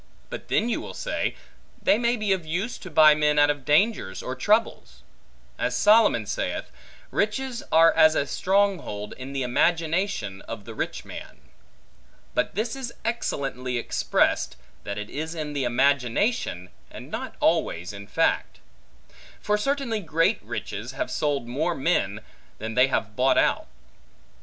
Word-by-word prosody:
But - - -7
then 225 - +1
you 240 - -1
will - - -8
say, - - -2 0.4
they 210 - +3
may 240 0 +2
be 215 -2 -1
of 185 -3 -2
use, 180 +9 -3
to 185 - -9
buy 155 -1 +7
men 150 0 +2
out 145 0 +6
of 145 -2 -6
dangers 150 - +1
or 130 - -4
troubles. 215 - 0 0.6
As - - 0
Solomon 210 - +5
saith, - - -3 0.4
Riches 240 +4 -1
are 165 +1 +6
as 155 0 +5
a 140 - +1
strong 195 +4 +2
hold, 105 -6 -6
in 130 +1 -8
the 135 -1 -2
imagination 160 - 0
of 110 -3 -7
the 115 - -8
rich - - -4
man. - - -9 1.0
But - - -1
this 225 +4 -1
is 250 -3 -6
excellently 135 - -2
expressed, 120 - +1 0.3
that 100 0 -4
it 105 0 -6
is 160 +3 -4
in 150 -2 -4
imagination, 130 - +1 0.2
and - - -11
not - - -5
always 90 +4 +1
in 100 0 -9
fact. - - 0 0.8
For 210 - +1
certainly 250 0 -1
great 165 -3 +1
riches, - - -6
have - - -3
sold 145 -5 -1
more 155 +8 -1
men, 110 - 0 0.4
than 110 +1 -5
they 125 +3 +5
have 110 -5 -2
bought 130 +3 +3
out. - - +2
150 Hz, 150 wpm, -25 LUFS, 125-205 Hz, 1.0 s, buy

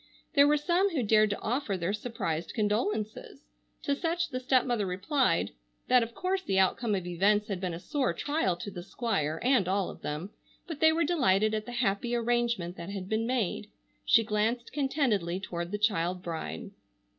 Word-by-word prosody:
There 285 -2 +6
were 300 0 +4
some 350 +6 +2
who 305 -9 -1
dared 215 0 +4
to 205 - -3
offer 230 -4 -1
their 180 +3 -1
surprised 210 -7 -3
condolences. 215 -1 -1 0.4
To 280 - +1
such 340 +2 -1
the 255 -3 -3
stepmother 250 -5 +1
replied 190 - +1 0.4
that 250 -1 +6
of 230 0 -4
course 375 +1 -1
the 195 - -1
outcome 205 +3 +2
of 185 -2 -3
events 200 +5 +2
had 190 -3 -3
been 180 -3 -2
a - - -7
sore 265 - 0
trial 290 - 0
to 200 +4 -7
the 175 - -7
Squire, 175 - -2
and 250 -7 +3
all 190 0 0
of - - -13
them, 155 +7 -4 0.3
but 325 -4 -6
they 315 0 +6
were 330 +1 +1
delighted 215 - +2
at 215 0 -2
the - - -5
happy 235 0 0
arrangement 235 -6 0
that 170 - -7
had 195 -2 -5
been 220 +1 0
made. 220 -4 -1 0.3
She 230 - +5
glanced 225 +3 -1
contentedly 255 - 0
toward 175 -2 -5
the 210 - -1
child 185 -4 0
bride. 160 - -5
215 Hz, 185 wpm, -29 LUFS, 190-255 Hz, 0.4 s, There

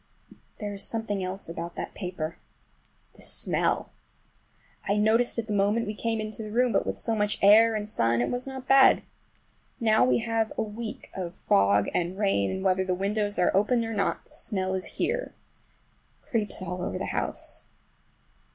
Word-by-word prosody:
But - - -18 0.2
there 205 -1 -4
is 200 - -2
something 215 -4 -1
else 185 +2 -4
about 170 +1 -6
that - - -5
paper—the 180 -3 -9
smell! - - -1 1.0
I 200 - +2
noticed 225 +4 +3
it 230 - -1
the 215 - -3
moment 205 +3 +2
we 210 - -3
came 225 +1 -2
into 215 +1 -5
the 215 - -6
room, 245 +3 +2
but - - +1
with - - -2
so 230 - +1
much 210 -1 0
air 220 +3 +7
and 210 -1 -2
sun 115 - +2
it 120 - 0
was 245 +2 -3
not 265 -1 -7
bad. 270 0 +6 0.8
Now 220 -2 +4
we 255 - +4
have 225 -1 0
had - - -12
a - - +1
week 220 +1 -7
of 180 -2 -5
fog 100 +1 +3
and 180 +2 -1
rain, 195 - +1
and 190 - -3
whether 190 -1 +2
the 185 -1 -1
windows 205 +2 -1
are 180 - +2
open 230 +4 +2
or 225 - -4
not, 200 - -1
the - - -21
smell 190 -3 -2
is 190 -1 -2
here. - - -1 0.8
It - - -26
creeps 210 -5 -1
all 180 0 -4
over - - -3
the - - -3
house. - - -3
210 Hz, 190 wpm, -27 LUFS, 185-225 Hz, 1.0 s, air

